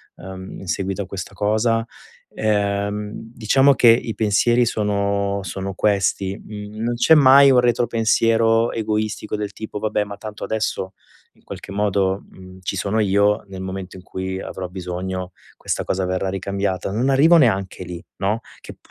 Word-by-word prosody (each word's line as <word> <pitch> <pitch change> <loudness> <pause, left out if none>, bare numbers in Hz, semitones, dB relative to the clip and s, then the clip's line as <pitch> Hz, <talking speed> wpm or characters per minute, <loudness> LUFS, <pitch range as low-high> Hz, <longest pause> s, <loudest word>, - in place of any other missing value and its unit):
ehm, 95 0 -9
in 95 - -10
seguito 95 +2 -2
a - - -9
questa 95 +1 -7
cosa". 110 +3 +1 0.5
Ehm, 105 0 -1
diciamo 120 +5 +2
che 120 - +6
i 115 -1 +3
pensieri 115 +3 +3
sono 100 -2 0
sono 95 0 -5
questi. 100 -1 +1
Mhmm, 105 0 -8
non 120 +1 0
c'è 120 +6 +5
mai 140 -2 +7
un 125 - +5
retropensiero 115 -1 +2
egoistico 110 -1 -2
del 105 -1 -4
tipo: 110 0 -7
"Vabbè, 105 0 0
ma 100 0 -8
tanto 105 -2 -8
adesso 105 -3 -2 0.4
in - - -29
qualche - - -9
modo, 100 -1 0
mhmm, 95 0 -14
ci 95 - -3
sono 100 +4 -1
io, 100 0 +2
nel 95 -1 -7
momento 95 0 -6
in - - -11
cui 95 0 -5
avrò 95 -1 -6
bisogno, 90 0 -5 0.2
questa - - -2
cosa 95 0 -1
verrà 95 +1 -1
ricambiata". 95 0 -2
Non 120 +7 0
arrivo 150 +6 +6
neanche 100 - +1
lì, 85 -1 -8
no? 105 +3 0 0.2
Che - - -10
p - - -27
100 Hz, 160 wpm, -21 LUFS, 95-110 Hz, 0.5 s, mai